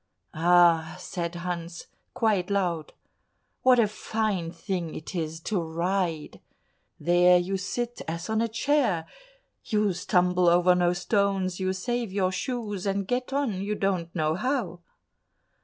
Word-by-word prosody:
"Ah!" 170 0 +4
said 175 -1 -5
Hans 170 -1 -5 0.3
quite 210 -5 +1
loud, 175 -6 -1 0.7
"what 255 -1 +5
a 230 -3 +4
fine 210 -5 -2
thing 175 -1 -4
it 155 - -7
is 160 -2 -3
to 195 +1 -1
ride! 170 -1 -2 0.6
There 175 +1 +5
you 180 +2 -1
sit 240 +6 -4
as 165 +1 -4
on 220 0 0
a 230 - +1
chair; 225 - +1 0.6
you 210 -2 +1
stumble 180 0 +2
over 175 +1 +5
no 175 0 +2
stones, 190 0 0
you 185 0 0
save 235 +3 -2
your 190 -1 +1
shoes, 210 -3 -3
and 195 -1 -1
get 250 +3 -2
on, 265 -9 -1
you 205 +2 -2
don't 190 -4 -1
know 155 -2 +1
how." 210 - -2
185 Hz, 140 wpm, -27 LUFS, 175-210 Hz, 0.7 s, what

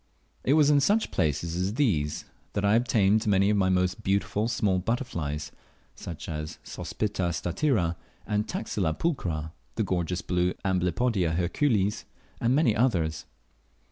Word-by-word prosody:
It 135 - +3
was 150 -2 +5
in 145 - +5
such 210 +10 +2
places 80 +2 0
as 95 +4 -1
these 85 - 0 0.3
that 100 - 0
I 100 - +4
obtained 110 -2 +3
many 100 0 +4
of 105 - +2
my 95 -2 +3
most 90 0 +1
beautiful 100 +2 0
small 105 -6 +1
butterflies, 85 - -3 0.4
such 85 -3 -8
as 75 0 -5
Sospita 100 -4 -2
statira 90 - 0 0.3
and 105 0 -1
Taxila 80 0 -2
pulchra, 85 - -2 0.2
the - - +1
gorgeous 90 -1 -1
blue 90 0 0
Amblypodia 90 -1 +1
hercules, 100 - +1 0.3
and 120 +3 +2
many 140 -8 +3
others. 90 - +1
95 Hz, 140 wpm, -27 LUFS, 85-115 Hz, 0.4 s, was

